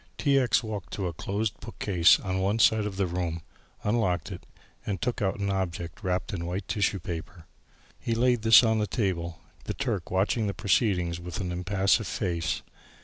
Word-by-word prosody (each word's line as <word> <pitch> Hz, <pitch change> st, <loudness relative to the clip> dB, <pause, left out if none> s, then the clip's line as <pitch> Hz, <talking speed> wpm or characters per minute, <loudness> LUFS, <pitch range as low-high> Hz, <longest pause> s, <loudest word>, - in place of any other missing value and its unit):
T. 140 Hz, -2 st, +3 dB
X. 120 Hz, -5 st, +2 dB
walked 105 Hz, -4 st, -6 dB
to 100 Hz, -, -2 dB
a 85 Hz, -, -2 dB
closed 100 Hz, +5 st, -3 dB
bookcase 100 Hz, -6 st, +3 dB
on 95 Hz, -1 st, -2 dB
one 100 Hz, +3 st, +1 dB
side 110 Hz, -1 st, +4 dB
of 95 Hz, -2 st, -6 dB
the 100 Hz, -, +2 dB
room, 85 Hz, -2 st, -3 dB, 0.4 s
unlocked 95 Hz, -7 st, 0 dB
it, -, -, -9 dB, 0.5 s
took 120 Hz, +3 st, -2 dB
out 95 Hz, -1 st, 0 dB
an 100 Hz, 0 st, 0 dB
object 90 Hz, 0 st, -3 dB
wrapped 90 Hz, 0 st, -1 dB
in 85 Hz, -3 st, -3 dB
white 90 Hz, +2 st, -4 dB
tissue 100 Hz, -1 st, +1 dB
paper. 85 Hz, 0 st, -7 dB, 0.5 s
He 115 Hz, -, -1 dB
laid 120 Hz, 0 st, +2 dB
this 115 Hz, +2 st, +8 dB
on 110 Hz, -1 st, +2 dB
the 105 Hz, -, 0 dB
table, 90 Hz, -6 st, -2 dB, 0.3 s
the -, -, -3 dB
Turk 110 Hz, -11 st, -2 dB
watching 100 Hz, +4 st, +1 dB
the 100 Hz, -, -3 dB
proceedings 90 Hz, -4 st, +1 dB
with 85 Hz, -1 st, -6 dB
an 90 Hz, -3 st, -3 dB
impassive 95 Hz, +4 st, +1 dB
face. 85 Hz, -6 st, -2 dB
95 Hz, 180 wpm, -27 LUFS, 90-110 Hz, 0.5 s, this